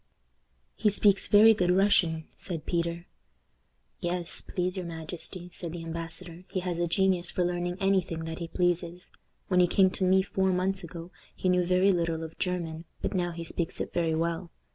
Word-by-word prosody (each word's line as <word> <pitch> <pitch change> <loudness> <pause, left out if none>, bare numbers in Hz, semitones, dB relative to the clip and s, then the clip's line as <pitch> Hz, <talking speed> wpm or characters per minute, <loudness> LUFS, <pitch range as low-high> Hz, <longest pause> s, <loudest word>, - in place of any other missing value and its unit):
"He 215 - +2
speaks 200 -1 +3
very 215 +2 +8
good 180 -4 +1
Russian," 180 -4 +3
said 165 -5 -5
Peter. 170 0 -1 0.9
"Yes, 175 -1 -2
please 180 0 -2
your 185 -2 -4
majesty," 170 +2 -6
said 170 -2 -4
the 170 -1 -6
embassador, 165 +1 -7
"he 190 -2 -2
has 175 -2 -3
a 175 - +1
genius 185 0 +2
for 180 - 0
learning 175 0 -2
any 195 -1 +3
thing 165 -2 -6
that 160 +1 -5
he 170 - -4
pleases. 175 0 -1 0.4
When 180 -1 +3
he 180 - +6
came 190 +1 +4
to 190 - -3
me 190 +1 +4
four 190 0 0
months 190 +1 0
ago 170 +1 -8 0.2
he 185 - 0
knew 180 0 +3
very 185 +2 +4
little 165 -2 -1
of 160 0 -9
German, 170 -3 -3 0.2
but - - -1
now 180 -2 0
he 170 0 -6
speaks 165 +1 -2
it - - -4
very 165 -2 +1
well. 170 +2 -1
175 Hz, 185 wpm, -28 LUFS, 170-185 Hz, 0.9 s, very